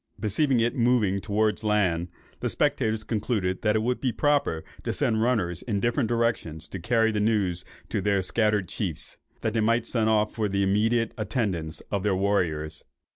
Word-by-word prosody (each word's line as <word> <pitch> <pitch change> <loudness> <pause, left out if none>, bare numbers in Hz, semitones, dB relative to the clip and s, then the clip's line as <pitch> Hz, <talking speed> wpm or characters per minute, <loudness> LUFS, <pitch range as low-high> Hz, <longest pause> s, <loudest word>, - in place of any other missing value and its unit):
Perceiving 120 +5 +1
it 115 +1 +1
moving 115 -6 +2
towards 110 +1 0
land, 95 -6 +1 0.3
the - - -1
spectators 110 -7 0
concluded 105 -4 -1
that 105 -1 +2
it 110 - +1
would 125 +2 -1
be 130 - +1
proper 145 - +1 0.2
to - - -2
send 110 -1 +1
runners 110 -8 +1
in 105 -5 -2
different 120 +1 0
directions 110 -10 -1
to 95 - -6
carry 115 +3 +2
the 105 - -1
news 100 -5 +1 0.3
to - - -1
their 100 -2 +1
scattered 105 -1 +1
chiefs, 85 -6 -4 0.2
that 110 - -1
they 115 - +1
might 115 +1 +2
send 110 -2 +1
off 105 -1 +2
for 110 -3 -1
the 100 0 +1
immediate 110 +4 +2
attendance 100 - -2
of 100 - 0
their 100 -1 +1
warriors. 80 -6 0
105 Hz, 180 wpm, -26 LUFS, 95-115 Hz, 0.3 s, moving